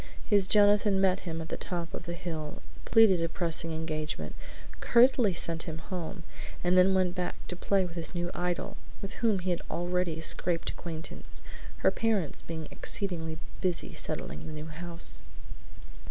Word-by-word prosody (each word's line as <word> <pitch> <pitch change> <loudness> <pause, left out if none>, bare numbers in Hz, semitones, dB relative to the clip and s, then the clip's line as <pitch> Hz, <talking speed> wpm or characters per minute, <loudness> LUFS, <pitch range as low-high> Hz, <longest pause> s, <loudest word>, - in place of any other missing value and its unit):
His 200 -3 +4
Jonathan 205 -1 +5
met 190 -1 +2
him 165 0 -3
at 160 - -7
the - - -3
top 170 -3 -4
of - - -6
the 170 - -3
hill, 160 -4 -5 0.2
pleaded 215 -6 +6
a 165 - 0
pressing 165 -1 -1
engagement, 155 - -3 0.5
curtly 235 -5 +5
sent 165 -1 0
him 160 - -4
home, 175 +1 -5 0.4
and 175 +1 +3
then 185 +1 +6
went 185 -2 +2
back 180 -1 -2
to 180 - -2
play 195 +1 +2
with 175 - -7
his 170 +1 -2
new 175 0 -1
idol, 175 -1 -2 0.2
with 195 +1 -6
whom 225 -4 +4
he 185 0 -1
had 175 - -1
already 175 -1 -1
scraped 165 +1 +1
acquaintance, 165 -1 -7 0.4
her - - +7
parents 215 -9 0
being 160 -2 -6
exceedingly 165 -5 -2 0.2
busy 180 -3 -1
settling 70 +5 -3
the 155 - -6
new 155 0 -6
house. 170 +2 0
175 Hz, 165 wpm, -30 LUFS, 160-190 Hz, 0.5 s, her